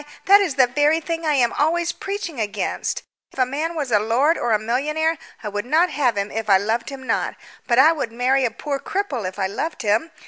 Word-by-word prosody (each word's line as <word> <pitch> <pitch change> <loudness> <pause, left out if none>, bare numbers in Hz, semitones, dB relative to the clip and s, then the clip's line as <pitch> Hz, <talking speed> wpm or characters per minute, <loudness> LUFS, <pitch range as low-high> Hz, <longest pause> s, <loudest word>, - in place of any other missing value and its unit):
that 400 +1 +7
is 340 -9 -1
the 260 -2 +6
very 290 +6 +2
thing 330 0 -4
I 305 - +3
am 245 -3 +2
always 335 +3 +1
preaching 390 - -5
against. 210 -1 -2 0.3
If - - -19
a 255 - +3
man 305 +6 -3
was 285 -6 -3
a 210 - +4
lord 245 +10 +2
or 240 -6 -1
a 215 - +4
millionaire 300 +9 -1 0.2
I 210 - -3
would 205 0 -3
not 320 +8 +2
have 250 -7 +1
him 200 +1 -2
if 220 -1 -4
I 195 - +7
loved 225 +4 -2
him 270 -1 -9
not, 230 - -1 0.3
but 240 - +2
I 285 +5 +7
would 295 -8 -3
marry 255 +3 +1
a 245 - +2
poor 275 +5 -4
cripple 275 - -3
if 185 - -15
I 195 - 0
loved 285 +10 -4
him. 215 +9 +1
265 Hz, 235 wpm, -22 LUFS, 225-315 Hz, 0.3 s, that